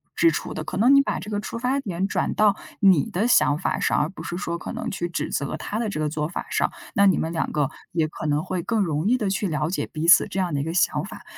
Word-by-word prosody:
支 335 - +5
出 - - -3
的， - - -4
可 - - -5
能 245 +6 +5
你 275 - +7
把 - - -2
这 210 - -8
个 205 - -1
出 210 +3 -5
发 255 +3 0
点 195 -6 -2
转 - - -1
到 210 -2 +4 0.3
你 185 -8 +5
的 205 +6 0
想 145 -11 +4
法 185 - -1
上， - - +1
而 150 +2 0
不 - - -10
是 175 - -5
说 170 -3 -3
可 - - -6
能 - - -4
去 175 -3 -3
指 - - -3
责 140 - -2
他 215 - -4
的 230 -2 -1
这 155 - -4
个 155 - 0
做 150 0 -2
法 170 - -5
上， - - +1 0.2
那 200 0 +5
你 190 - +4
们 160 - -2
两 165 - -1
个 150 -1 0 0.2
也 160 -2 +1
可 155 - -6
能 150 +1 +1
会 185 -2 -3
更 225 +3 0
容 160 +2 -1
易 250 - +3
地 215 -5 -2
去 195 +1 -1
了 155 +1 -1
解 - - -2
彼 160 +2 -3
此 175 - +7
这 195 - -4
样 180 -4 -1
的 140 - 0
一 - - -2
个 160 - -3
想 185 - +2
法。 - - -9
180 Hz, 315 characters per minute, -24 LUFS, 155-205 Hz, 0.3 s, 你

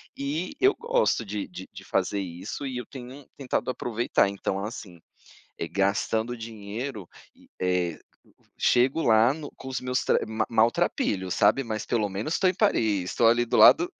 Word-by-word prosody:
E 150 - -3
eu 395 +1 +5
gosto 475 - +1
de 100 0 -4
de - - -9
de - - -10
fazer 100 - -1
isso 95 +9 -6
e 130 - -4
eu 125 - -5
tenho 130 +1 -10
tentado 130 -2 -2
aproveitar, 120 -4 0
então, 100 0 -3
assim, 100 -6 -8 0.6
eh, 85 - -3
gastando 110 +5 0
dinheiro 110 0 -6 0.3
e, - - -22
eh, 90 -3 0 0.6
chego 130 +6 +3
lá 115 +2 +4
no 155 -2 -8
com 135 - -9
os 130 - -2
meus 125 0 -1
tre - - +3
ma 110 0 -1
maltrapilhos, 110 -4 +1
sabe, 105 +6 +3
mas 110 -4 -4
pelo 110 -3 0
menos 105 +11 -3
estou 190 - +3
em 185 - +1
Paris, 105 - +1
estou 115 - +2
ali 120 +1 +3
do 120 - 0
lado 350 +3 +7
115 Hz, 170 wpm, -26 LUFS, 100-130 Hz, 0.6 s, lado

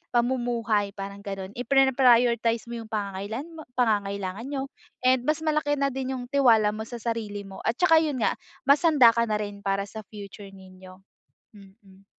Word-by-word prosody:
pamumuhay, 235 -4 0
parang 200 0 -7
ganun. 195 -1 -6
Iprina-prioritize 245 -3 +3
mo 235 - -4
yung - - -13
pangangailan 205 +5 -4
mo 320 -2 -11
pangangailangan 200 -2 -1
niyo 275 -1 -4 0.3
and 255 0 +2
mas 310 +1 0
malaki 305 -2 +1
na 275 -1 0
din 265 0 -3
yung 245 - -6
tiwala 230 -7 +4
mo 220 +1 -6
sa 240 -2 -7
sarili 215 -3 -3
mo, 195 -1 -11
at 225 - +1
tsaka 325 +1 +5
yun 285 -6 -2
nga, - - +3 0.3
mas 280 +1 +5
handa 285 -8 +6
ka 235 0 +1
na 215 - 0
rin 205 -1 -5
para 195 0 0
sa 220 +2 -9
future 200 -1 -10
ninyo, 185 0 -15 0.5
mm. 195 -1 -18
230 Hz, 170 wpm, -26 LUFS, 200-260 Hz, 0.5 s, handa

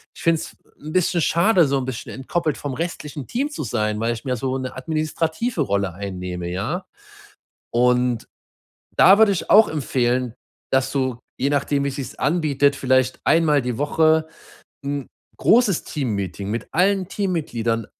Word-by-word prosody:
ich - - -12
finde 165 -1 +3
es - - -9 0.2
'n 155 - -8
bisschen 180 -1 +2
schade, 170 +2 +4
so 140 0 +1
'n 130 - -4
bisschen 130 -3 -6
entkoppelt 155 +4 -2
vom 145 -2 -4
restlichen 150 -4 -5
Team 275 +5 -1
zu 295 - -5
sein, 105 -3 -1
weil 115 +1 0
ich 115 - -8
mir 130 -1 0
so 130 +2 -2
'ne 130 -1 -5
administrative 160 - -2
Rolle 100 -7 0
einnehme“, 90 -2 -5
ja? 90 +2 -3 0.9
Und 125 0 +2 0.7
da 195 +2 +7
würde 215 -2 +5
ich 180 - -4
auch 215 0 +7
empfehlen, 125 -5 0 0.4
dass 130 0 +2
du, 130 -3 0 0.2
je 140 +2 0
nachdem 145 0 +1
wie - - +1
sich's 135 -1 -6
anbietet, 145 -2 +2
vielleicht 130 -1 +2
1-mal 155 -3 +4
die 125 -2 -3
Woche 160 +2 +2 0.6
'n 140 -1 -3 0.3
großes 220 -6 +4
Teammeeting 100 - -3
mit 115 +1 -3
allen 190 +1 +2
Teammitgliedern 120 - -2
140 Hz, 155 wpm, -22 LUFS, 120-165 Hz, 0.9 s, da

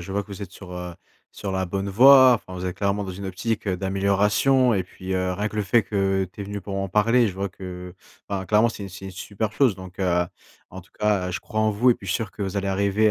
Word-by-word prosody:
je 85 - -8
vois 100 +1 -1
que 100 - -21
vous 100 0 -7
êtes 95 - -7
sur, 95 -2 -11
heu, 90 -1 -6 0.4
sur 100 -2 -5
la 95 0 -1
bonne 100 +2 -3
voie, 130 +4 +8
enfin, 95 -5 -6
vous 90 - -5
êtes 90 - -4
clairement 100 0 0
dans 95 - -5
une 100 +2 -7
optique, 105 +4 -3
heu, 95 -2 0
d'amélioration 100 +7 +2
et 95 - +1
puis, 95 +1 -8
heu, 95 0 0
rien 105 +4 -2
que 105 - -9
le 105 - +1
fait 110 +4 +3
que 95 -2 0
tu - - -11
es - - -3
venu 100 +1 -5
pour 100 0 -6
en 95 0 -2
parler, 115 +4 +3
je 95 - -6
vois 100 +1 -2
que 90 -1 -8 0.3
enfin 95 -2 -3
clairement, 110 +3 +4
c'est 100 -3 -7
c'est 95 +1 -10
une 95 - -6
super 100 +3 -4
chose, 125 -4 +2
donc 95 -1 -11
heu, 90 -2 +2 0.5
en 95 - -8
tout 95 - -22
cas, 105 -4 +1
heu, - - -3
je 90 - -4
crois 110 -2 -3
en 110 0 +3
vous 115 +5 +3
et - - +4
puis, 100 - -12
je - - -2
suis - - +2
sûr 110 -3 -4
que 100 - -7
vous 95 0 -3
allez 100 0 -1
arriver 100 +2 +2
100 Hz, 290 wpm, -24 LUFS, 95-105 Hz, 0.5 s, voie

